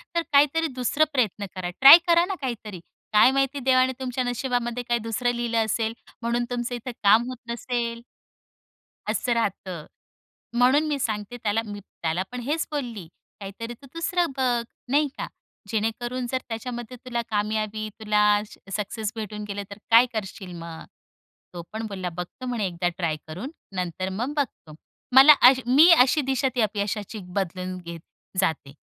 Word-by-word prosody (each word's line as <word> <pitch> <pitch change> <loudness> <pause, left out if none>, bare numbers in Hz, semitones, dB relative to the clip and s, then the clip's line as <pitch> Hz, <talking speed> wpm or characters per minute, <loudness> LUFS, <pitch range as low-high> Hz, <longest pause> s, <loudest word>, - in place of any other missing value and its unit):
तर 335 - +3
काहीतरी 295 +3 +4
दुसरं 255 +5 +2
प्रयत्न 215 -6 0
करा, 180 -1 -3
ट्राय 275 +4 +12
करा 340 0 +5
ना 385 +1 -3
काहीतरी. 220 -7 -5 0.3
काय 215 +4 +7
माहिती, 275 +1 0
देवाने 255 0 +3
तुमच्या 255 -1 -2
नशिबामध्ये 245 -1 -2
काही 240 0 +1
दुसरं 230 +2 0
लिहिलं 230 -1 0
असेल, 220 +1 -1 0.3
म्हणून 235 +1 0
तुमचं 245 0 -3
इथं 240 +1 -6
काम 210 +3 +6
होत 255 - -6
नसेल 235 0 -3 1.1
असं 245 - 0
राहतं. 190 -7 -3 0.7
म्हणून 260 +5 +5
मी 290 -2 -1
सांगते 215 0 -3
त्याला, 215 +1 +1
मी 205 -1 -7
त्याला 170 -2 -3
पण 250 - -5
हेच 300 +6 -1
बोलली, 240 - -4 0.3
काहीतरी 205 +4 -7
तू 275 +4 -16
दुसरं 335 0 0
बघ, 245 -2 +1 0.3
नाही 295 +2 +3
का, - - -4 0.4
जेणेकरून 240 +3 -2
जर 260 - +1
त्याच्यामध्ये 240 +1 -6
तुला 240 -2 -2
कामयाबी, 215 0 -1
तुला 210 -1 +3 0.3
सक्सेस 210 +1 -3
भेटून 210 -1 -5
गेलं, 200 0 -4
तर 200 - -9
काय 230 +2 +8
करशील 195 -3 -5
मग? 165 -1 -8 0.7
तो 175 - -6
पण 220 +1 -4
बोलला, 190 -3 -4
बघतो 180 +8 -7
म्हणे 240 -5 -1
1दा 175 0 -2
ट्राय 165 -4 0
करून, 180 - -6 0.3
नंतर 185 +1 -3
मग 240 +9 -3
बघतो. 230 - -3 0.4
मला 275 +3 +10 0.2
अशी, 260 0 +1
मी 280 +8 +7
अशी 295 -1 +5
दिशा 265 0 0
ती 245 - +2
अपयशाची 210 0 -2 0.2
बदलून 185 -1 -3
घेत 170 -2 -8 0.4
जाते. 160 -7 -1
230 Hz, 155 wpm, -25 LUFS, 205-255 Hz, 1.1 s, ट्राय